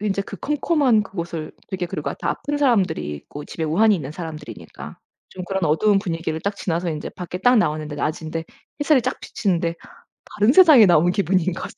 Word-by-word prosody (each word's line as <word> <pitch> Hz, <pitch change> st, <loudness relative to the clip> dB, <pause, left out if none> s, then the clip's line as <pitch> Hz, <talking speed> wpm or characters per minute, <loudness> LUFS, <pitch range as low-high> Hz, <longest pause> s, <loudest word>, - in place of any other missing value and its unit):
인제 200 Hz, -1 st, -1 dB
그 200 Hz, -, -9 dB
컴컴한 280 Hz, -, +1 dB
그곳을 170 Hz, -6 st, -6 dB, 0.2 s
되게 185 Hz, -2 st, -3 dB
그리고 165 Hz, -4 st, -4 dB
다 -, -, -3 dB
아픈 290 Hz, 0 st, -3 dB
사람들이 195 Hz, -, +1 dB
있고 145 Hz, -, -10 dB
집에 160 Hz, -, -5 dB
우환이 205 Hz, +8 st, +3 dB
있는 145 Hz, -5 st, -4 dB
사람들이니까 155 Hz, -2 st, -9 dB, 0.3 s
좀 185 Hz, -1 st, -8 dB
그런 190 Hz, -1 st, -1 dB
어두운 195 Hz, +7 st, +3 dB
분위기를 165 Hz, -4 st, -3 dB
딱 200 Hz, +3 st, -3 dB
지나서 175 Hz, 0 st, -2 dB
인제 150 Hz, -1 st, -5 dB
밖에 180 Hz, 0 st, -7 dB
딱 245 Hz, +5 st, +4 dB
나왔는데 155 Hz, -6 st, 0 dB
낮인데 160 Hz, +2 st, -3 dB, 0.4 s
햇살이 290 Hz, -3 st, +3 dB
쫙 255 Hz, -, -2 dB
비치는데 170 Hz, -4 st, -1 dB, 0.6 s
다른 210 Hz, +4 st, +4 dB
세상에 305 Hz, -, +8 dB
나온 175 Hz, 0 st, +4 dB
기분인 185 Hz, -2 st, +1 dB
거죠. -, -, -6 dB
180 Hz, 420 characters per minute, -22 LUFS, 160-215 Hz, 0.6 s, 세상에